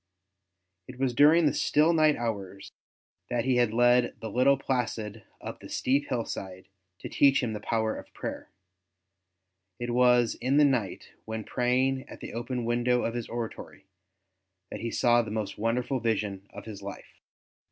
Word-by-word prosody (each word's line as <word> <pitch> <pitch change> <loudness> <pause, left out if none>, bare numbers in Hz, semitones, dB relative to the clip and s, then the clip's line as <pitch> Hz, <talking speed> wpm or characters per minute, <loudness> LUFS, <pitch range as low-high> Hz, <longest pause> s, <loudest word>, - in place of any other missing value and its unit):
It 125 - -10
was 130 -1 0
during 155 +6 +6
the 145 - +3
still 155 +3 +3
night 155 -2 +4
hours 100 -4 -5 0.6
that 120 0 -1
he 130 -2 +2
had 120 -3 +3
led 120 +1 +3
the 110 - -6
little 130 +4 +4
Placid 115 -5 -3 0.2
up - - -8
the - - -11
steep 140 +3 0
hillside 95 -6 -4 0.4
to - - -5
teach 140 -1 +3
him 115 -3 -2
the 105 - -4
power 110 +1 -1
of - - -10
prayer; - - -6 1.3
and 120 0 -4
it - - -1
was 125 -1 +4
in 130 +3 +2
the 150 - +6
night, 120 -9 -1 0.2
when 110 0 -4
praying 130 +3 0
at - - -10
the - - -8
open 120 +1 -3
window 120 +1 +1
of 115 - -1
his 120 -1 -5
oratory, 115 -1 -6 0.9
that - - -5
he 115 - -2
saw 120 +1 +3
the 110 - -6
most 105 -2 -4
wonderful 125 +4 0
vision 105 -4 -2
of - - -11
his 105 -3 -8
life. 100 0 -10
120 Hz, 170 wpm, -28 LUFS, 110-130 Hz, 1.3 s, during